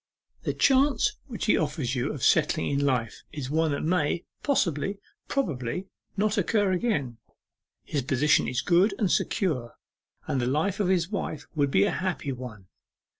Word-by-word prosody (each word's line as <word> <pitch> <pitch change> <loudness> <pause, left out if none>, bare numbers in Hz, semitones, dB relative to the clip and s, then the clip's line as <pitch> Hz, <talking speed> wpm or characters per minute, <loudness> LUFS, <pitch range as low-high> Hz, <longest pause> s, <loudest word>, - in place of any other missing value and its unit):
The - - -2
chance 270 -2 +3
which 235 -5 -4
he 210 - +4
offers 145 -5 -1
you 125 +3 -1
of 140 - -6
settling 155 -1 +3
in 140 0 +1
life 125 -5 0
is 140 -3 -5
one 160 +1 +2
that 140 - -2
may 165 0 +1 0.2
possibly, 195 - 0 0.3
probably, 180 - -2 0.3
not 210 +1 +1
occur 205 0 +2
again. 175 - -1 0.7
His 145 - -2
position 135 +3 +2
is 120 -1 -1
good 180 +4 +3
and 200 -5 +1
secure, 140 - 0 0.5
and 130 - -1
the 120 - 0
life 160 +9 0
of 200 - +1
his 180 0 +1
wife 185 -7 -3
would 145 -3 +1
be 100 - +4
a - - +2
happy 180 -6 -2
one. 120 -6 -8
155 Hz, 165 wpm, -27 LUFS, 135-195 Hz, 0.7 s, he